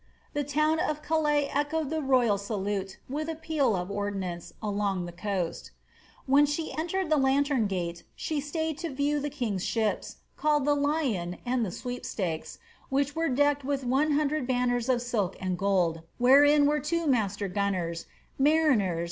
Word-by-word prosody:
The 290 - 0
town 305 +3 +1
of 300 -1 -1
Calais 300 -3 +2
echoed 295 +1 0
the 315 0 -1
royal 250 -7 +3
salute 200 -2 -3
with 305 +4 -3
a 325 - -2
peal 305 -8 0
of 180 +1 -3
ordnance 195 -4 -3
along 200 -3 -1
the 175 - -7
coast 180 -1 -3
^ - - -38 0.5
When 285 +2 +5
she 305 +2 -3
entered 345 +2 -2
the 310 - +5
lantern 270 -3 +2
gate 170 -3 -3
she 305 -2 -2
staid 315 +1 -3
to 340 -1 -3
view 285 +1 0
the 295 +1 -2
kiiig'i 240 -10 -2
ships, 220 +2 -1 0.2
called 300 -2 +2
the 290 0 +3
^Lyon' 280 - 0
and 245 0 +1
the 210 - -1
^Sweepstakes,' 190 -7 -4 0.3
which 280 +1 0
were 325 0 0
decked 285 +2 +2
M 270 - -5
ith 275 -1 0
one 275 +5 +2
hundred 295 -2 0
banners 245 -1 0
of 245 -2 +2
silk 215 -7 -1
and 185 -1 -1
gold, 175 -4 +1 0.2
wherein 285 +4 +6
were 300 +1 +2
two 335 +3 -1
master 205 -7 +1
gunners, 180 -4 -2 0.2
» - - -36
State 270 - -2
Paper 310 -1 +5
MS. 185 -6 0
265 Hz, 180 wpm, -28 LUFS, 200-295 Hz, 0.5 s, wherein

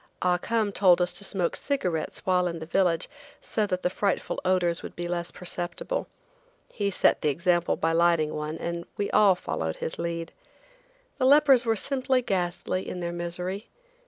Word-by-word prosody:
Ah 180 -1 +2
Cum 220 0 0
told 185 -3 +5
us 180 0 +1
to 175 - -5
smoke 185 -3 0
cigarettes 180 - -2
while 180 -1 +3
in 170 -1 -3
the 160 - -7
village 170 -1 +1 0.3
so 215 -2 -1
that 185 -2 -2
the - - +2
frightful 200 0 -1
odors 180 -2 +1
would - - -9
be 175 0 -4
less 175 0 -3
perceptible. 180 - -4 0.7
He 200 -2 0
set 195 - +2
the 150 - +2
example 175 +3 +1
by 165 - 0
lighting 165 -2 +3
one, 150 +1 -4
and 170 +1 -4
we 200 - -1
all 200 -3 +5
followed 80 - -3
his - - -5
lead. 170 -1 -3 0.9
The 255 - +2
lepers 270 -3 +6
were 225 - +3
simply 260 +2 0
ghastly 185 -2 -2
in 180 - -5
their 170 -1 -3
misery. 180 +4 -4
180 Hz, 175 wpm, -27 LUFS, 170-200 Hz, 0.9 s, lepers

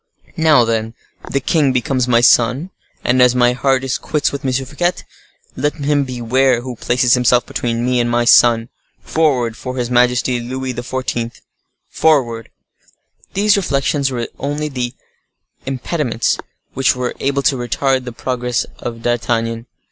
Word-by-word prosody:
Now, 155 -7 +4
then, 115 0 -2 0.3
the 140 - 0
king 140 +1 +2
becomes 125 0 0
my 120 -1 +4
sun, 125 +8 +3 0.3
and 125 +1 +2
as 125 0 +5
my 120 0 +3
heart 130 +1 +1
is 135 -1 -2
quits 150 -2 -1
with 140 - -6
M. 130 - 0
Fouquet, 145 +7 -1 0.6
let 145 +3 -1
him 145 -1 0
beware 125 0 +1
who 125 0 -6
places 120 +1 +2
himself 125 -1 +3
between 120 0 -2
me 125 0 +1
and 120 0 +1
my 120 0 +1
sun! 115 -1 +5 0.3
Forward, 130 -8 +1
for 130 +2 -6
his 120 -1 -2
majesty 125 0 +2
Louis 130 +2 -4
XIV.!—Forward!" 120 +1 -2 0.9
These 205 +1 +3
reflections 140 -6 0
were 125 -2 -3
the 115 - -5
only 140 -4 -3 0.7
impediments 135 -3 -1 0.3
which 135 -1 +2
were 125 -1 -3
able 140 0 0
to 135 - +3
retard 130 +2 0
the 125 - -5
progress 125 0 -2
of 115 -1 -6
D'Artagnan. 115 -1 -1
125 Hz, 145 wpm, -17 LUFS, 120-135 Hz, 0.9 s, as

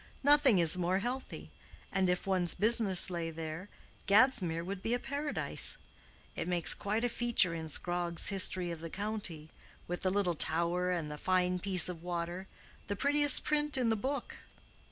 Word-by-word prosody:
"Nothing 285 -6 +5
is 170 +1 +3
more 180 +1 0
healthy. 250 +6 -5 0.4
And 190 -2 0
if 180 0 -1
one's 185 -3 0
business 205 -3 +2
lay 170 -2 -3
there, 165 +4 -7 0.4
Gadsmere 195 -7 +3
would 190 0 -6
be 230 +4 -1
a - - -3
paradise. 285 +3 -1 0.6
It - - -4
makes 175 -2 +2
quite 210 +3 -3
a - - +2
feature 235 -7 +1
in 160 -1 -6
Scrogg's 175 +2 0
history 185 -2 +1
of 170 - -7
the 165 +1 -7
county, 195 -6 -5 0.4
with 175 0 -5
the 185 - 0
little 190 -2 0
tower 170 +3 +1
and 165 -4 -3
the 150 - -8
fine 180 -1 0
piece 185 -2 +4
of 175 -3 -6
water—the 175 +3 -7
prettiest 290 +5 +5
print 295 -1 0
in 245 -3 +1
the 225 - +1
book." 265 +4 -4
185 Hz, 165 wpm, -31 LUFS, 170-225 Hz, 0.6 s, Nothing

